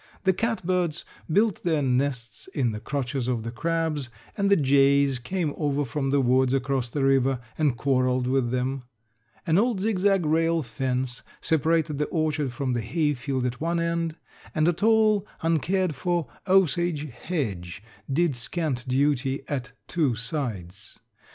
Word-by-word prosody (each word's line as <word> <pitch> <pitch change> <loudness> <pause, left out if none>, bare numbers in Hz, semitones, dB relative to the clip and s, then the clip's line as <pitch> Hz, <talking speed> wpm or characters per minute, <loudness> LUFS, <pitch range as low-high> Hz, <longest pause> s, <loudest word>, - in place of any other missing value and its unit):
The 190 - +4
catbirds 185 -6 -1 0.3
built 210 +2 +2
their 160 -4 +1
nests 125 -4 -1
in 125 -5 +1
the 105 - -5
crotches 135 -1 -3
of 120 -3 -1
the 115 - -4
crabs 160 0 -1 0.3
and 200 -1 +1
the 200 - +6
jays 140 -2 +3
came 155 +4 -2
over 145 -1 0
from 135 +2 -2
the 140 +1 +3
woods 130 +1 +3
across 135 -2 -1
the 140 +2 -2
river 135 -1 +3 0.2
and 145 -6 +1
quarreled 130 0 +1
with 130 -1 +1
them. 130 +2 -1 0.6
An 165 +3 +3
old 230 -2 +1
zigzag 195 -3 +2
rail 165 +1 +2
fence 125 +1 -2 0.2
separated 160 -1 +1
the 150 - +2
orchard 155 -4 -1
from 130 +1 -2
the 120 - 0
hay 150 +6 0
field 130 -1 -2
at 125 +1 -3
one 170 +1 0
end 170 -1 -1 0.4
and 155 +1 +3
a 175 - +4
tall 215 +1 +3 0.2
uncared 165 +2 +1
for 175 +4 -1 0.2
osage 175 -5 +2
hedge 100 - -4 0.3
did 160 0 +2
scant 130 +1 -2
duty 135 0 +1
at 130 -4 -4
two 145 -8 +1
sides. 110 - -4
140 Hz, 150 wpm, -26 LUFS, 125-165 Hz, 0.6 s, the